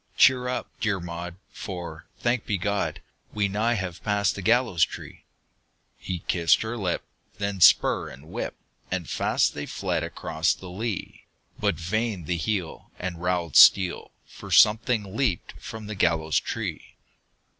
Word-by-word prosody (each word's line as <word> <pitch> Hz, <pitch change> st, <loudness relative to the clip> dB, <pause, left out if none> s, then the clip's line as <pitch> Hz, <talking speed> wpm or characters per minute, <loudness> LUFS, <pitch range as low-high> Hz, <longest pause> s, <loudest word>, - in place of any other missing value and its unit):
"Cheer 125 Hz, -1 st, +5 dB
up, 125 Hz, -, -2 dB
dear 105 Hz, -4 st, 0 dB
Maud, 85 Hz, 0 st, -6 dB, 0.2 s
for, 85 Hz, -4 st, -7 dB
thanked 120 Hz, -1 st, -1 dB
be 100 Hz, -, 0 dB
God, 100 Hz, +2 st, -2 dB, 0.3 s
We 105 Hz, -1 st, +2 dB
nigh 110 Hz, +4 st, 0 dB
have 95 Hz, -4 st, -5 dB
passed 105 Hz, -1 st, +1 dB
the 95 Hz, -, -6 dB
gallows 115 Hz, -4 st, +3 dB
tree!" -, -, -5 dB, 0.7 s
He 90 Hz, -2 st, -6 dB
kissed 85 Hz, +1 st, +3 dB
her 110 Hz, +2 st, -4 dB
lip; 95 Hz, -6 st, -2 dB, 0.3 s
then 100 Hz, -2 st, -3 dB
spur -, -, +5 dB
and 70 Hz, +5 st, -13 dB
whip! -, -, -4 dB, 0.3 s
And -, -, -3 dB
fast -, -, +1 dB
they 75 Hz, -, -5 dB
fled -, -, -2 dB
across 80 Hz, +1 st, -1 dB
the 95 Hz, -, -10 dB
lea! 105 Hz, +1 st, -5 dB, 0.3 s
But -, -, +1 dB
vain 100 Hz, +4 st, -2 dB
the 85 Hz, +2 st, -1 dB
heel 90 Hz, 0 st, -3 dB
and 90 Hz, -2 st, -5 dB
rowel 90 Hz, -4 st, -1 dB
steel, 95 Hz, -3 st, +6 dB, 0.2 s
For -, -, -12 dB
something 110 Hz, -2 st, +4 dB
leaped 115 Hz, -, 0 dB
from 110 Hz, -1 st, -8 dB
the 105 Hz, -, -5 dB
gallows 80 Hz, -5 st, +2 dB
tree! -, -, -5 dB
95 Hz, 150 wpm, -26 LUFS, 85-110 Hz, 0.7 s, steel